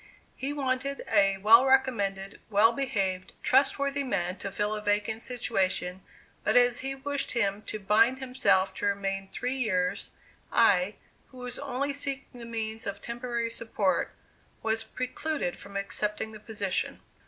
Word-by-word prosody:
He 270 +2 -3
wanted 275 -1 -2
a 195 -2 +4
well 220 +5 +7
recommended, 220 -8 +1
well 220 +2 +5
behaved, 195 -8 -2
trustworthy 280 +1 +2
man 185 -8 -1
to 200 - -4
fill 210 +2 -1
a 210 - -3
vacant 210 +2 0
situation, 190 -7 -1 0.4
but - - +3
as 245 0 +5
he 270 +1 -3
wished 285 +1 -2
him 205 -4 +1
to - - -3
bind 220 +5 +4
himself 200 -8 +2
to 205 - 0
remain 195 -1 -1
three 250 +6 -3
years, 185 -7 0 0.4
I, 200 -3 +4 0.3
who 255 - -16
was 250 0 -5
only 280 +1 -2
seeking 275 -2 -3
the 235 - -8
means 220 -1 -3
of 200 0 -4
temporary 235 0 -3
support, 215 -4 0 0.5
was 225 0 +1
precluded 255 - -3
from 200 0 -7
accepting 210 +2 -2
the 215 - -10
position. 205 -3 -2
225 Hz, 145 wpm, -28 LUFS, 200-255 Hz, 0.5 s, well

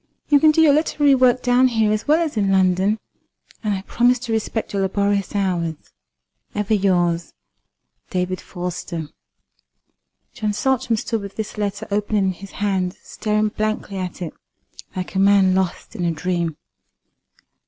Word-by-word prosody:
You 290 -1 +6
can 310 - +6
do 305 +1 +4
your 295 -3 +6
literary 295 -1 +3
work 255 -1 +3
down 250 +1 +4
here 225 -3 +2
as 215 +4 -1
well 310 +3 +4
as 310 -5 -4
in 200 -2 +1
London, 190 +2 +3 0.7
and 210 -2 0
I 190 - -5
promise 245 +4 +2
to 235 - -5
respect 220 0 -2
your 200 - 0
laborious 200 +1 0
hours. 175 -5 0 0.8
Ever 210 +1 0
yours, 175 -5 +1 0.7
"DAVID 180 0 -2
FORSTER." 175 -3 -5 1.2
John 215 -1 -2
Saltram 250 0 +1
stood 225 0 -2
with 200 -1 -8
this 220 -1 -5
letter 205 0 -3
open 210 +1 0
in 195 -2 +2
his 195 +2 -11
hand, 190 -2 -1
staring 215 0 -1
blankly 215 -2 -3
at 180 0 -5
it, 165 - -5 0.6
like 185 -1 -4
a 190 - 0
man 195 -1 +5
lost 190 +3 -2
in 185 - -3
a 170 - +2
dream. 170 -1 -2
200 Hz, 155 wpm, -21 LUFS, 185-220 Hz, 1.2 s, You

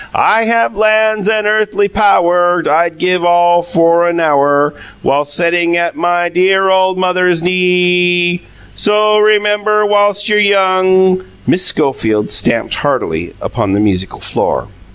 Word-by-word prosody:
"I 225 +1 +2
have 230 -1 0
lands 215 0 +1
and 215 -1 -1
earthly 210 -1 0
pow 200 -2 +2
wur. 175 0 +1
I'd 165 +1 0
give 180 0 -1
all 175 0 +3
for 170 0 +1
a - - 0
now 160 -4 0
wur, 145 +1 +1 0.3
Whi - - 0
ilst 145 0 -3
setting 170 0 0
at 170 0 -2
MY 175 - -3
Y 175 0 0
Y 175 - -2
dear 190 +2 +1
old 185 0 +1
mother's 180 -2 0
knee 180 - 0
ee, 180 -1 +1 0.3
So 210 0 0
o 215 0 +2
o - - +2
rem 210 -1 +2
mem 210 0 -1
bur 210 0 +1
whilst 205 0 0
you're 210 -1 +2
young 185 -2 +2
" - - -29
Miss 180 - 0
Schofield 110 -5 -1
stamped - - 0
heartily 80 +2 -3
upon 100 -1 -3
the 100 - 0
musical 95 -3 -2
floor. - - -3
180 Hz, 175 wpm, -12 LUFS, 170-205 Hz, 0.3 s, all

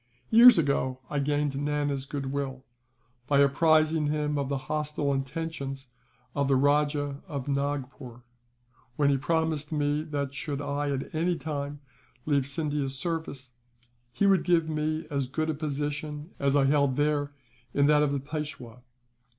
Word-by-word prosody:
"Years 235 +1 +9
ago 140 -4 +1
I 145 - 0
gained 145 0 0
Nana's 145 -1 -1
goodwill, 135 -2 -4 0.6
by 140 - +3
apprising 155 +2 +3
him 150 0 -1
of 140 -2 -1
the 140 - 0
hostile 150 -2 -1
intentions 135 -1 -4 0.4
of 140 -1 0
the 135 - +3
Rajah 145 +1 +1
of 140 -6 -5
Nagpore; 140 -3 -3 0.7
when 140 0 +3
he 140 - +2
promised 160 0 -1
me 145 -1 0
that, 140 -3 -3
should 145 0 -4
I 145 0 -2
at 135 -1 -3
any 170 +3 +1
time 145 -1 -5 0.4
leave 140 -3 +1
Scindia's 145 -2 -2
service, 160 -5 -4 0.6
he 200 - 0
would 195 -3 +4
give 170 -2 +2
me 155 +1 -2
as 140 -2 -1
good 155 +4 -1
a - - -2
position 150 +1 -4
as 140 0 +2
I 140 -1 +4
held 140 -1 +3
there 145 0 0 0.4
in 140 - +2
that 150 0 +5
of 150 -1 +2
the 140 - 0
Peishwa. 140 -5 -6
145 Hz, 150 wpm, -28 LUFS, 140-150 Hz, 0.7 s, Years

